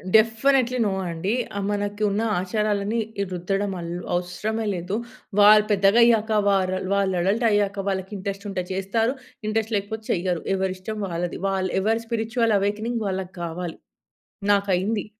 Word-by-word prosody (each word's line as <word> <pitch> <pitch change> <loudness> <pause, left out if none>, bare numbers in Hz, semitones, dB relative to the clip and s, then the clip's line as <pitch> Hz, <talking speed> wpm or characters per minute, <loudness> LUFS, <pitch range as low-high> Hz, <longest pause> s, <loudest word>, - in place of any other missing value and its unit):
Definitely 250 +3 +4
no 200 - +1 0.2
అండి. 170 +5 -2 0.2
ఆ - - 0
మనకున్న 205 +1 0 0.2
ఆచారాలన్ని 210 +3 0 0.3
రుద్దడం 195 +3 -1
ఆల్ 170 0 -5 0.2
అవసరమే 210 +5 -2
లేదు. 180 +3 -3 0.4
వాళ్ళు 210 +1 +8
పెద్దగయ్యాక 220 +2 +4 0.2
వరల్ 185 -1 +1
వాళ్ళు 195 -2 +1
అడల్టయ్యాక 205 0 +2
వాళ్ళకింట్రెస్టుంటె 195 0 -3
చేస్తారు, 225 +6 0 0.3
ఇంట్రెస్ట్ 220 +1 -1
లేకపోతే 220 +2 -5
చెయ్యరు. 180 -1 -1
ఎవరి 190 -1 -1
ఇష్టం 215 +4 -6
వాళ్ళది. 175 -1 -3
వల్ 190 -1 0
ఎవరి 225 +3 +1
స్పిరిచ్యుల్ 230 0 +1
అవేకెనింగ్ 215 +4 -1
వాళ్ళకావాలి. 180 -2 -4 0.8
నాకయింది. 200 +1 +1
200 Hz, 115 wpm, -24 LUFS, 190-220 Hz, 0.8 s, వాళ్ళు